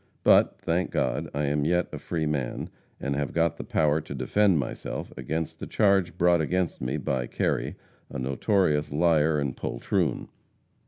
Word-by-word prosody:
But, - - +5
thank 85 +2 -1
God, 75 +6 -1
I 75 - -2
am 75 +1 0
yet 90 +3 +1
a - - -6
free 80 -2 -2
man, 70 -5 -2 0.3
and 70 0 -2
have 70 0 -2
got 85 -1 +1
the - - -5
power 75 +1 +1
to 70 -2 -8
defend 95 +8 +2
myself 70 - -4
against 80 +5 -4
the - - -6
charge 95 -4 +2
brought 85 -1 +4
against 90 +2 -1
me 60 - -1
by 65 -3 -2
Kerry, - - -1 0.3
a - - -6
notorious 75 - +1
liar 80 0 +3
and 70 -3 -2
poltroon. - - -1
75 Hz, 165 wpm, -27 LUFS, 70-85 Hz, 0.3 s, But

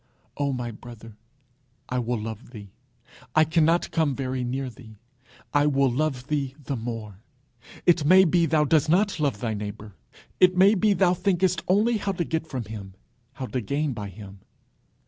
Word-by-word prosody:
Oh, 145 -1 -1
my 125 -2 -3
brother! 115 -1 -12 0.7
I 125 - -1
will 120 -1 -2
love 110 +2 -7
thee. 105 -5 -11 0.6
I 155 - +6
cannot 165 +1 +2
come 155 -5 +1
very 130 -1 -3
near 130 +2 -3
thee: 115 -3 -13 0.6
I 145 0 +3
will 140 -2 +2
love 135 -1 -1
thee 140 -2 -2
the 135 - -3
more. 115 -4 -6 0.7
It 175 -3 +4
may 185 +6 +7
be 170 0 +3
thou 155 -2 +3
dost 155 0 +2
not 185 +1 +2
love 140 -9 -1
thy 115 -2 -1
neighbour; 105 0 -7 0.5
it 185 0 +5
may 195 +3 +6
be 210 0 +3
thou 180 -1 +3
thinkest 180 -1 +1
only 215 +5 +3
how 200 -1 -2
to 175 - -1
get 160 0 -3
from 130 -5 -4
him, 100 -3 -9 0.4
how 130 - -5
to 125 0 -3
gain 140 +5 -1
by 105 -3 -6
him. 100 0 -12
135 Hz, 175 wpm, -25 LUFS, 115-165 Hz, 0.7 s, may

